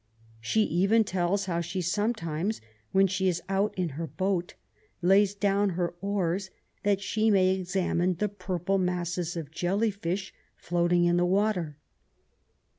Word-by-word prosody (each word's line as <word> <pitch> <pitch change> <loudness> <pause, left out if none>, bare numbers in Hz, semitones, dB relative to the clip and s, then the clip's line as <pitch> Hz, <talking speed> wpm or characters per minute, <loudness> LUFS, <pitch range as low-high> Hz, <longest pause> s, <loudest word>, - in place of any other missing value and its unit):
She 215 - +1
even 195 +6 +3
tells 190 0 0
how 170 -2 -1
she 170 +3 -4
sometimes, 190 0 -1 0.3
when 195 0 +5
she 190 0 0
is 175 -2 +1
out 195 +2 +1
in 180 -2 0
her 160 +4 -5
boat, 180 +4 -2 0.5
lays 195 +2 +4
down 200 0 +2
her 175 -1 -1
oars 195 -1 -1 0.3
that 200 -1 +1
she 215 +3 +1
may 190 -3 +4
examine 185 -1 0
the 210 +5 0
purple 190 -1 -2
masses 175 -1 -2
of 155 -3 -6
jelly 195 +7 0
fish 190 0 -4 0.2
floating 175 0 +1
in 175 0 +3
the 175 - +3
water. 185 -6 0
185 Hz, 145 wpm, -28 LUFS, 175-200 Hz, 0.5 s, when